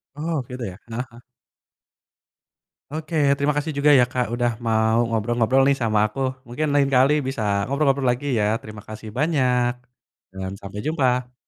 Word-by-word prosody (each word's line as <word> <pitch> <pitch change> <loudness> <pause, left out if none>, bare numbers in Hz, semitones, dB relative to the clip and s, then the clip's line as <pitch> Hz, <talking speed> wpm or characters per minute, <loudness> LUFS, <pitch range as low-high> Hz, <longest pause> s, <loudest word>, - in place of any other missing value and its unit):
Oke 150 -5 -3
deh, 100 -7 -5
heeh 120 +3 -3
heeh. 120 +1 -15 1.7
Oke 155 +2 -5 0.2
terima 145 +1 +1
kasih 145 +2 -1
juga 145 +1 +4
ya - - +6
Kak 125 -1 0
udah 120 0 +1 0.2
mau 110 0 +2
ngobrol-ngobrol 120 +3 +2
nih 140 0 +3
sama 110 -2 +2
aku 120 +6 -9 0.3
mungkin 150 +6 -2
lain 140 -1 +3
kali 135 +3 +5
bisa 130 -3 -3 0.2
ngobrol-ngobrol 140 0 +1
lagi 125 +4 -4
ya 105 - +2 0.2
terima 110 -1 -10
kasih 110 0 -8
banyak, 125 -5 +2 0.6
dan 95 0 -5
sampai 100 +1 -7
jumpa. 125 -5 0
125 Hz, 150 wpm, -23 LUFS, 115-140 Hz, 1.7 s, ya